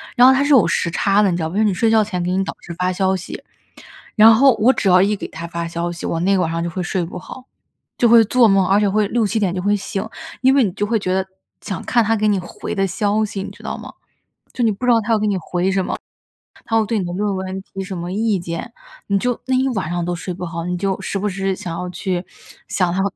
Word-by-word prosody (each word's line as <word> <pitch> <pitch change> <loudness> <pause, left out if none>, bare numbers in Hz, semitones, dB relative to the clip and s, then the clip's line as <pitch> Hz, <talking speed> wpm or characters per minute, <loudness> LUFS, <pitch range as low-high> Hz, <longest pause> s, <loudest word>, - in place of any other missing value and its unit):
然 250 0 +7
后 - - +8
它 265 +1 +2
是 290 - 0
有 265 -6 +6
时 170 - 0
差 200 +4 +2
的， 205 - +3
你 170 - -1
知 - - -3
道 160 - -2
吗？ - - -9
就 - - +1
是 - - +4
你 205 - +2
睡 225 +5 +1
觉 220 -1 +5
前 190 -4 -3
给 180 - -1
你 190 +1 +1
导 - - -5
师 - - -10
发 180 0 +1
消 190 +1 +1
息。 185 0 -7 0.7
然 220 +1 +8
后 265 +4 +5
我 235 +5 +5
只 215 - -1
要 180 -1 +6
一 205 +2 +2
给 - - -6
他 165 - -8
发 170 0 -4
消 170 +1 -3
息， 175 - -7
我 165 - -1
那 195 +2 +2
晚 180 -3 0
上 165 0 -2
就 170 - -2
会 185 +2 -4
睡 180 0 -1
不 170 - -7
好。 255 +7 -11 0.5
就 240 - +3
会 230 0 +8
做 245 +3 +4
梦， 195 -2 +3
而 195 - +4
且 210 - +2
会 210 +1 +1
6-7 225 0 0
点 190 -4 0
就 180 - -2
会 205 +2 +1
醒， 195 0 -4 0.4
因 265 +1 +5
为 275 -1 +4
你 195 - -2
就 205 - -1
会 225 +1 0
觉 185 -2 -1
得 190 0 0 0.4
想 195 - -5
看 240 -2 +3
他 220 +1 +1
给 215 0 +1
你 205 -1 +2
回 175 - -6
的 195 -1 +1
消 205 +3 0
息， 200 -2 -4
你 - - -6
知 - - -15
道 - - -4
吗？ - - -9 0.6
就 245 - -1
你 220 - +3
不 205 +5 -7
知 250 - +3
道 230 - +4
他 225 +1 -2
要 220 - +3
给 210 0 0
你 200 - 0
回 180 +2 -1
什 190 -1 0
么， - - -3 0.7
他 225 0 +2
会 220 - +1
对 220 +1 -1
你 185 - -2
的 175 - -4
论 200 +1 -1
文 190 0 -4
提 195 0 -7
什 190 -1 -6
么 175 +1 -5
意 215 +1 +1
见。 170 -1 -6 0.4
你 200 - +2
就 245 +4 -1
那 260 - +2
一 260 +1 +2
晚 195 -10 -2
上 175 0 -2
都 175 0 -2
睡 175 +2 -6
不 180 +1 -6
好， 170 -1 -5
你 180 0 -2
就 195 +1 -1
时 - - -3
不 200 +2 -1
时 195 -1 -2
想 180 -4 -6
要 180 0 -4
去 180 0 -3 0.4
想 180 -2 0
他 190 - 0
195 Hz, 310 characters per minute, -19 LUFS, 180-215 Hz, 0.7 s, 后